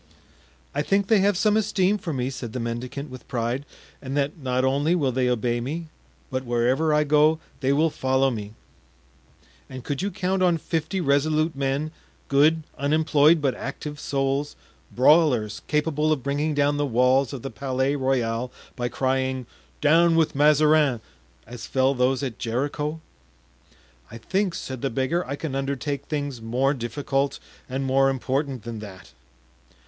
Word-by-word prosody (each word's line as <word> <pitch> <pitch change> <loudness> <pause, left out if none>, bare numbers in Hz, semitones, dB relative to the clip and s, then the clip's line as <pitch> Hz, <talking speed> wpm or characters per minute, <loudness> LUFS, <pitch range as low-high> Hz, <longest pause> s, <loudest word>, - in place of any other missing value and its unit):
"I 145 - 0
think 195 +6 +1
they 220 -3 +5
have 200 -1 +2
some 210 +2 +3
esteem 210 -2 +1
for 175 -3 -4
me," 130 -2 -2
said 120 -4 -7
the 125 - -3
mendicant 125 +4 -5
with 130 - -11
pride, 125 +2 -2 0.3
"and 135 +1 -4
that 145 +1 0
not 130 -1 0
only 145 +6 +2
will 140 -7 +1
they 125 0 +1
obey 120 0 0
me, 155 +6 -5 0.4
but 130 0 -2
wherever 125 +6 +1
I 150 0 +3
go 150 +2 +4 0.2
they 135 -1 +1
will 155 +3 +2
follow 130 0 +1
me." 105 -2 -6 1.1
"And 130 -1 -8
could 145 +4 -3
you 200 - -1
count 190 -1 -1
on 175 -2 +3
fifty 160 +3 -2
resolute 155 +2 +1
men, 140 +3 -1 0.4
good, 155 +3 +4 0.2
unemployed, 155 +1 +3
but 135 -3 +2
active 150 +2 -6
souls, 140 +1 -1 0.4
brawlers, 125 -7 +3
capable 150 0 +1
of 145 -5 0
bringing 145 +2 -1
down 145 0 +2
the 145 - +1
walls 125 +2 +3
of 135 -4 -7
the 135 - -5
Palais 135 +1 -1
Royal 125 -3 -1 0.2
by 120 -2 -2
crying, 130 0 -1 0.4
'Down 165 +3 +5
with 160 -1 +2
Mazarin,' 150 -2 +4 0.5
as 115 -1 -9
fell 130 +1 +2
those 130 +1 +1
at 125 -5 -4
Jericho?" 145 +6 -2 1.1
"I 115 - -9
think," 185 - -1
said 130 -6 -6
the 135 - 0
beggar, 135 +8 0
"I 140 - -3
can 145 -1 -5
undertake 140 +1 -3
things 145 -5 -4
more 125 +5 +1
difficult 135 +2 -2 0.3
and 135 +2 -2
more 135 +1 +3
important 135 -1 -2
than 115 -2 -6
that." 100 -3 -11
140 Hz, 160 wpm, -24 LUFS, 130-155 Hz, 1.1 s, they